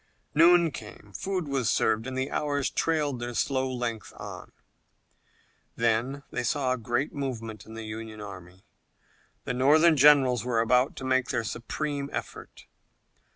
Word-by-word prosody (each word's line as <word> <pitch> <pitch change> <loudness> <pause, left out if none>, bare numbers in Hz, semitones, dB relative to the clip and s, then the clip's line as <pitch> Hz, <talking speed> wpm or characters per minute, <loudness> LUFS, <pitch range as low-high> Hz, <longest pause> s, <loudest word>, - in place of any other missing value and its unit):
Noon 170 +1 +6
came, 105 -3 -11
food 185 - -2
was 135 -5 0
served, 110 +3 +1
and 130 0 -4
the 130 +1 -2
hours 145 -2 -1
trailed 150 -5 0
their 120 0 -5
slow 130 +1 0
length 120 -3 -4
on. - - -9 1.2
Then 120 +4 0
they - - -2
saw 130 +1 +1
a - - -2
great 120 +5 -1
movement 115 -7 -5
in 110 - -10
the 115 - -6
Union 110 0 -7
army. 95 -2 -10 0.8
The - - -3
Northern 155 +6 +5
generals 135 -4 +5
were 120 -2 0
about 125 +4 +2
to - - -8
make 130 -1 +1
their 115 - 0
supreme 140 +5 -4
effort. - - -7
130 Hz, 150 wpm, -27 LUFS, 115-140 Hz, 1.2 s, Noon